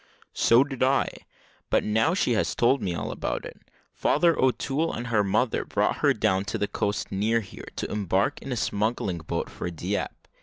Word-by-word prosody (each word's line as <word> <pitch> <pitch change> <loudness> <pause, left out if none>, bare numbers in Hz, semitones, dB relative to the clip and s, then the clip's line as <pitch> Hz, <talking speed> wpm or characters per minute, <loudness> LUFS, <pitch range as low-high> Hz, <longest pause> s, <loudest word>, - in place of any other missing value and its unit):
"So 115 +3 +5
did 135 -3 -7
I; 130 +1 +3 0.6
but - - +3
now 110 +11 +2
she 155 - +1
has 110 - +1
told 125 +3 +3
me 90 -2 -2
all - - -3
about - - -3
it. - - -10 0.3
Father 170 +2 +3
O'Toole 135 +5 +1
and 120 - -4
her 110 -3 +2
mother 110 +5 +1
brought - - 0
her - - +3
down 95 +1 +1
to 115 - -2
the 105 -1 0
coast 100 0 -2
near 110 +4 +1
here, 100 - -11
to - - -4
embark 100 - 0
in 135 - -7
a 125 - -1
smuggling 105 -4 -1
boat 85 +1 -3
for - - -5
Dieppe. 85 - -2
110 Hz, 190 wpm, -26 LUFS, 100-130 Hz, 0.6 s, So